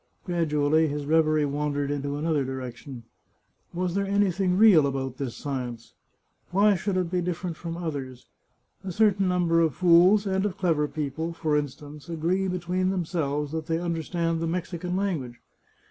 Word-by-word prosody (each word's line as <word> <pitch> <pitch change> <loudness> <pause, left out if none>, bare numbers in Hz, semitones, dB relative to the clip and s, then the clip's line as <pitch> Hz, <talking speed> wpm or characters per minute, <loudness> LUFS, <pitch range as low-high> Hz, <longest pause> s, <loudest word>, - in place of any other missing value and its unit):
Gradually 160 -3 +2
his 145 0 -3
reverie 155 0 +3
wandered 145 0 -1
into 145 0 -2
another 155 -2 0
direction. 130 -1 -7 0.7
Was 180 0 -2
there 200 +1 0
anything 195 -2 +1
real 190 -9 +7
about 135 -2 -3
this 130 -4 -4
science? 125 -5 -5 0.6
Why 205 +3 +4
should 190 +1 -1
it 180 -2 -1
be 180 -1 +1
different 175 0 -3
from 165 +1 -6
others? 140 -7 -5 0.6
A 190 - -4
certain 205 -1 +3
number 175 -2 +2
of 160 -6 +1
fools 180 +4 +5
and 190 -1 0
of 200 -2 -2
clever 160 -6 +1
people, 155 +3 -4
for 155 -2 -1
instance, 145 +1 -5
agree 170 +4 0
between 180 0 -1
themselves 155 -6 -2
that 160 -1 -4
they 165 - 0
understand 165 0 -2
the 165 - -1
Mexican 180 +1 -3
language. 160 -12 -2
165 Hz, 155 wpm, -26 LUFS, 145-180 Hz, 0.7 s, real